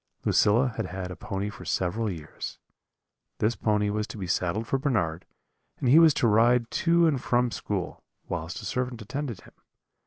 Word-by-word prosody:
] - - -36
"Lucilla 120 +5 +4
had - - -2
had 95 - -7
a 95 - -3
little 90 - -6
pony 95 +2 -3
for - - -11
several 105 +5 -1
years; 80 -6 -7 0.8
this 110 +3 +1
pony 105 -1 +1
was 105 +1 -2
to 105 - -8
be 95 - -4
saddled 90 +4 -1
for 135 +4 0
Bernard, 95 - -1 0.5
and 125 - 0
he 150 +6 +8
was 165 -1 +7
to 120 - +2
ride 115 +2 +3
to 170 0 +3
and 145 -6 +2
from 120 0 +1
school, 100 -5 -4 0.2
whilst 85 +5 -4
a - - -7
servant 125 +3 -2
attended 130 -2 -4
him. - - -18
110 Hz, 190 wpm, -27 LUFS, 95-125 Hz, 0.8 s, he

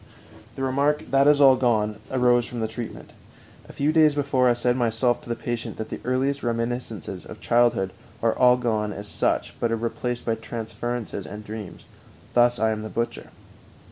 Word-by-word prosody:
"_ - - -25
The 135 - -4
remark 140 +3 0
"That 135 +1 +4
is 145 -1 +5
all 135 -2 +8
gone" 110 -4 +1
arose 125 -2 +3
from 120 - -6
the 110 - 0
treatment. 110 +1 -7 0.6
A - - -8
few 145 +2 0
days 155 -2 +5
before 135 -3 +2
I - - +5
said 120 +1 +1
myself 120 0 +1
to - - -13
the 115 - 0
patient 120 0 -4
that 110 - -5
the - - -5
earliest 135 +3 0
reminiscences 115 -3 -3
of - - -11
childhood 120 -6 +2 0.3
are 115 -1 +2
all 125 -1 +5
gone 110 -4 -1
as 100 +1 -8
such, - - -1
but 115 - 0
are - - +2
replaced 120 +1 -3
by 115 - +1
transferences 115 -1 -5
and 105 +2 -8
dreams. 105 -3 -8 0.5
Thus 120 0 +4
I 110 0 +2
am 110 -1 -3
the 110 - -6
butcher. 115 +1 -3
120 Hz, 190 wpm, -24 LUFS, 110-130 Hz, 0.6 s, all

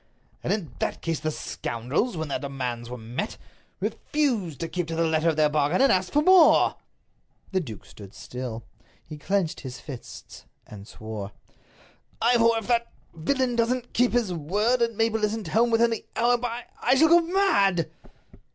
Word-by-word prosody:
"And - - -1
in 195 - -2
that - - -3
case 165 -2 -1
the 155 - -2
scoundrels, 150 - -3
when 160 -1 -3
their - - -1
demands 125 -4 -4
were 125 - -6
met, 120 - -5 0.4
refused 225 - -1
to 165 - -2
keep 175 -1 -3
to 165 - -4
the 165 0 +1
letter 160 +1 +2
of 160 - 0
their 155 0 +4
bargain 150 +3 +1
and 275 - +5
asked 185 -1 +1
for 295 - +3
more." 365 -1 +6 0.7
The 190 - +1
duke 115 - -8
stood 95 +4 -13
still. 125 -3 -6 0.4
He 155 -2 -10
clinched 185 0 -1
his 125 -2 -8
fists, 135 -6 -10 0.2
and 100 -1 -11
swore: 110 -3 -7 0.9
"Ivor, 230 -1 +4
if 225 - -4
that—villain 240 - -1
doesn't 245 +1 0
keep 245 -1 +2
his 235 -7 +1
word, 205 +10 0
and 230 -2 0
Mabel 225 -1 +1
isn't 210 -4 -1
home 230 +7 +3
within 230 0 +3
the 225 - -3
hour, 240 +2 +3
by—I 240 +1 -1
shall 315 +4 +5
go 345 +1 +7
mad!" 200 - +2
185 Hz, 170 wpm, -26 LUFS, 145-235 Hz, 0.9 s, go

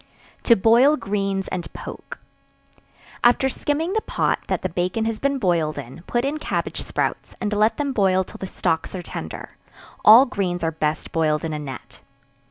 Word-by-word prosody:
To 235 - +7
Boil 235 +9 +5
Greens 195 -3 -2
and 180 -2 -5
Poke. - - -8 1.1
After 245 +2 +4
skimming 310 +7 -2
the 440 - +1
pot - - 0
that - - -2
the 185 - -1
bacon 180 +6 -1
has 225 -1 -2
been 280 0 0
boiled 170 -8 0
in, 125 +7 -8
put 240 +1 0
in 295 +3 -2
cabbage - - -3
sprouts, - - -3
and 210 -1 -2
let 210 +2 +2
them 285 -2 -1
boil 190 -4 +3
till - - -12
the 190 - -5
stalks 165 -1 -2
are 180 - -5
tender; 80 - -8 0.5
all 230 +5 +9
greens 185 -8 -2
are 165 - +1
best 155 0 -2
boiled 155 -1 +1
in 160 - -3
a 150 - -3
net. 135 -3 -9
195 Hz, 180 wpm, -22 LUFS, 170-240 Hz, 1.1 s, all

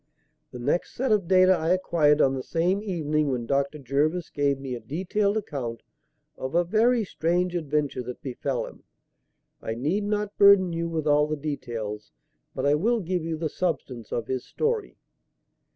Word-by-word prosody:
"The - - -9
next 125 +8 -1
set 260 -1 0
of 205 -5 +2
data 185 0 +6
I 165 -1 -1
acquired 155 -5 +3
on 135 - +4
the 130 - -3
same 175 +7 0
evening, 155 -7 0
when 125 -3 -2
Dr. 140 +3 0
Jervis 150 +6 -1
gave 140 -1 +1
me 135 -1 -5
a 120 - -4
detailed 190 - -1
account 125 - -4 0.6
of 130 +4 -4
a 175 - +4
very 225 +6 +3
strange 180 +1 0
adventure 150 -5 -1
that 125 0 -8
befell 130 0 -2
him. - - -12 0.8
I 110 - -3
need 155 - 0
not 210 0 -2
burden 200 -3 +6
you 170 0 -2
with 160 -2 -2
all 150 0 +4
the 155 0 -2
details, 120 -8 -5 0.4
but - - -2
I 145 - +4
will 225 +10 +2
give 180 -3 -2
you 165 -1 -3
the 160 0 -1
substance 140 - -3
of 115 - -2
his 130 -1 -3
story." 455 -1 -2
155 Hz, 175 wpm, -26 LUFS, 135-185 Hz, 0.8 s, data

